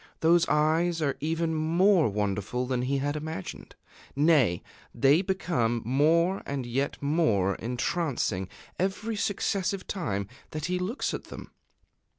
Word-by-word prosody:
Those 170 +1 +4
eyes 160 +3 +2
are 140 -2 0
even 160 +2 -1
more 165 - +3
wonderful 105 +4 -2
than 125 -1 -1
he 135 +2 0
had 145 +2 -1
imagined 155 - -6 0.4
nay! 140 - +3 0.3
they 140 +7 +4
become 170 - -1
more 165 - +2
and 140 -3 -3
yet 135 +4 -2
more 140 - +2
entrancing 120 - -1 0.3
every 200 +4 -1
successive 195 -1 -1
time 100 - -3 0.2
that 155 -1 -4
he 180 +1 -1
looks 195 +9 -2
at - - -5
them! - - -10
155 Hz, 130 wpm, -28 LUFS, 125-175 Hz, 0.4 s, Those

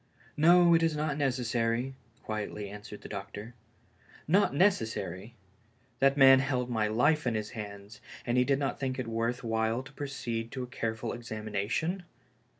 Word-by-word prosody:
"No, 170 +2 +6
it 165 - +5
is 165 -2 +2
not 150 -1 -1
necessary," 125 -2 0 0.3
quietly 105 -1 -4
answered 105 +1 -9
the - - -9
doctor. 105 +3 -7 0.7
Not 190 +7 +4
necessary! 115 - 0 0.6
That 135 +1 +4
man 135 -1 +8
held 130 -2 -1
my 110 -2 +1
life 145 +7 +2
in 120 - +1
his 110 0 -3
hands, 100 -1 -8 0.2
and 120 - 0
he 125 - +5
did 135 +1 +2
not 140 -1 -2
think 130 -1 -2
it 130 - -2
worth 115 +2 -1
while 115 +1 0
to 130 - -13
proceed 120 -5 -4
to 130 -2 -3
a - - -3
ca]*e 115 -3 -3
ful 115 +1 -4
examination 110 - -2
120 Hz, 160 wpm, -30 LUFS, 110-140 Hz, 0.7 s, man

